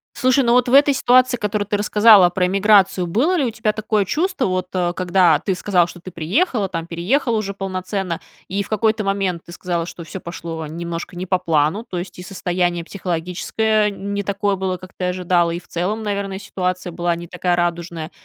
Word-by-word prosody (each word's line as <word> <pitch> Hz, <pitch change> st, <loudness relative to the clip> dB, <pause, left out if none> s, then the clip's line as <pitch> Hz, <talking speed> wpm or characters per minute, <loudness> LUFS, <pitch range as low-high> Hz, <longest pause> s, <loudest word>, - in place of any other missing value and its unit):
Слушай, 255 Hz, +1 st, +3 dB
ну 235 Hz, -1 st, +3 dB
вот 250 Hz, 0 st, +4 dB
в 245 Hz, -, -1 dB
этой 285 Hz, +1 st, +6 dB
ситуации, 255 Hz, -1 st, +4 dB
которую 210 Hz, -1 st, -2 dB
ты 205 Hz, -, 0 dB
рассказала 210 Hz, -2 st, +6 dB
про 180 Hz, +1 st, 0 dB
эмиграцию, 195 Hz, -2 st, +3 dB
было 290 Hz, -, +1 dB
ли 280 Hz, -, +1 dB
у 235 Hz, -, -1 dB
тебя 215 Hz, -1 st, 0 dB
такое 215 Hz, -1 st, 0 dB
чувство, 335 Hz, -, 0 dB
вот, 185 Hz, -1 st, -1 dB
э, 175 Hz, -1 st, 0 dB
когда 180 Hz, -3 st, +3 dB
ты 190 Hz, +2 st, -1 dB
сказала, 180 Hz, -2 st, +2 dB
что 175 Hz, -, -11 dB
ты 185 Hz, +1 st, -9 dB
приехала, 200 Hz, -, 0 dB
там 165 Hz, -3 st, -5 dB
переехала 225 Hz, -, 0 dB
уже 200 Hz, -2 st, -3 dB
полноценно, 185 Hz, -2 st, -3 dB, 0.3 s
и 200 Hz, +2 st, -2 dB
в -, -, -12 dB
какой-то 215 Hz, 0 st, +1 dB
момент, 195 Hz, -3 st, -1 dB
ты -, -, -12 dB
сказала, 175 Hz, -2 st, -2 dB
что 170 Hz, -, -9 dB
всё 165 Hz, +4 st, -7 dB
пошло 165 Hz, -2 st, -6 dB
немножко 170 Hz, +2 st, -6 dB
не 180 Hz, +1 st, -4 dB
по 185 Hz, 0 st, +1 dB
плану, 165 Hz, +5 st, 0 dB
то 180 Hz, -, -4 dB
есть 175 Hz, 0 st, -8 dB
и 180 Hz, -, -7 dB
состояние 175 Hz, -2 st, -1 dB
психологическое 200 Hz, +5 st, -1 dB
не 200 Hz, 0 st, -4 dB
такое 200 Hz, 0 st, 0 dB
было, 190 Hz, -1 st, -2 dB
как 185 Hz, +1 st, -13 dB
ты 180 Hz, -, -2 dB
ожидала, 180 Hz, -1 st, +1 dB
и 170 Hz, -, -3 dB
в -, -, -22 dB
целом, 200 Hz, +6 st, -2 dB
наверное, 200 Hz, -2 st, -3 dB
ситуация 185 Hz, -2 st, -3 dB
была 170 Hz, 0 st, -1 dB
не 170 Hz, 0 st, -8 dB
такая 180 Hz, 0 st, 0 dB
радужная. 170 Hz, -1 st, -2 dB
185 Hz, 205 wpm, -20 LUFS, 175-210 Hz, 0.3 s, этой